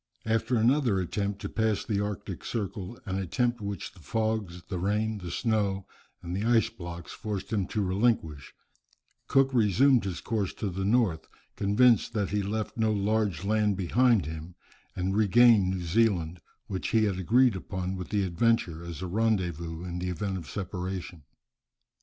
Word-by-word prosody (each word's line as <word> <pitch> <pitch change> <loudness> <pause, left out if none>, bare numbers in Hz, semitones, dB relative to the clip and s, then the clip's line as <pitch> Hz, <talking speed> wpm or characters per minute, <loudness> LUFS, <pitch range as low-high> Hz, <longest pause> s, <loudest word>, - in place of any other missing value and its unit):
After 115 +2 +1
another 120 -2 +3
attempt 100 +2 -2
to - - -2
pass 110 -2 0
the 100 -3 0
arctic 105 -2 -5
circle, 105 0 -4
an 95 -1 -2
attempt, 120 +5 0
which 100 -1 -5
the 95 - -18
fogs, 105 0 -2
the 90 - -5
rain, 105 +3 0
the 90 -2 -7
snow, 100 -1 0 0.4
and 85 +1 -4
the 100 - -2
ice 115 0 +3
blocks 85 -5 -8
forced 105 0 -5
him 100 -4 0
to 105 - -1
relinquish, 95 - 0 0.8
Cook 135 -1 +3
resumed 120 +2 +4
his 90 -4 -3
course 105 -6 -2
to 105 - -3
the 95 +2 -3
north, 105 -6 +2 0.3
convinced 110 +4 +3
that 105 -4 0
he 105 0 +1
left 105 +3 -3
no 110 -1 +2
large 105 -3 0
land 105 -1 +2
behind 115 - +3
him, 80 +3 -7 0.4
and 95 +1 -1
regained 110 -1 +5
New 95 -1 -2
Zealand, 90 -3 +1 0.3
which 95 -1 -4
he 110 -1 +3
had 100 -3 0
agreed 120 +5 +4
upon 95 0 -4
with 90 -2 -6
the 105 -2 +1
Adventure 90 -3 +1
as 85 +1 -7
a - - -3
rendezvous 90 -5 -1
in 90 0 -4
the 90 +1 -2
event 95 +3 -2
of 85 -4 -6
separation. 90 -3 -5
100 Hz, 165 wpm, -28 LUFS, 90-110 Hz, 0.8 s, regained